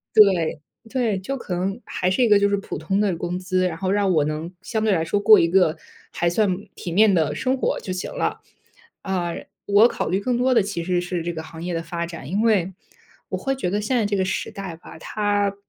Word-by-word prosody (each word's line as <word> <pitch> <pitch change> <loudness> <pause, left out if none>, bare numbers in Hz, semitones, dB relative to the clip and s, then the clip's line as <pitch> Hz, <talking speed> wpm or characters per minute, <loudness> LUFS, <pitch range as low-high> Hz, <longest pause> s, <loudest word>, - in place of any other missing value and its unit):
对， 180 -7 +5 0.3
对， 230 -6 0
就 270 +9 -4
可 195 - -6
能， 190 +4 -2
还 180 - -1
是 190 +7 +2
一 - - +4
个 205 -1 +6
就 200 0 +3
是 200 - +1
普 200 - -5
通 160 +6 -1
的 205 -4 +1
工 175 +2 -3
资， 185 0 0
然 165 -2 -5
后 185 +2 -1
让 200 -1 +2
我 155 -4 +3
能 155 +3 -4
相 220 -2 -2
对 220 - +2
来 160 - +1
说 200 +5 0
过 210 +1 +7
一 165 - +3
个 175 -2 +3 0.3
还 170 - 0
算 205 +4 +2 0.3
体 175 - -6
面 205 +3 +5
的 160 -4 +1
生 260 +1 0
活 - - -1
就 185 - -5
行 185 - -4
了。 - - -2 0.6
啊， 185 -3 -2 0.4
我 205 +3 +6
考 - - -3
虑 185 +3 +1
更 240 +4 0
多 255 +1 +2
的 - - +5
其 195 -4 -4
实 180 +1 0
是 175 -1 -3
这 175 +1 -3
个 160 - -5
行 160 +1 -10
业 175 0 -3
的 165 - -1
发 170 0 -4
展。 170 -5 -8
因 200 +5 0
为， 200 -5 +2 0.6
我 - - -2
会 270 0 -1
觉 255 -9 -2
得 205 +3 0
现 255 +5 -1
在 230 -3 +2
这 205 0 0
个 190 - +1
时 190 - -3
代 195 -4 -6
吧， 160 - -13
它 205 +1 0
190 Hz, 265 characters per minute, -23 LUFS, 175-210 Hz, 0.6 s, 过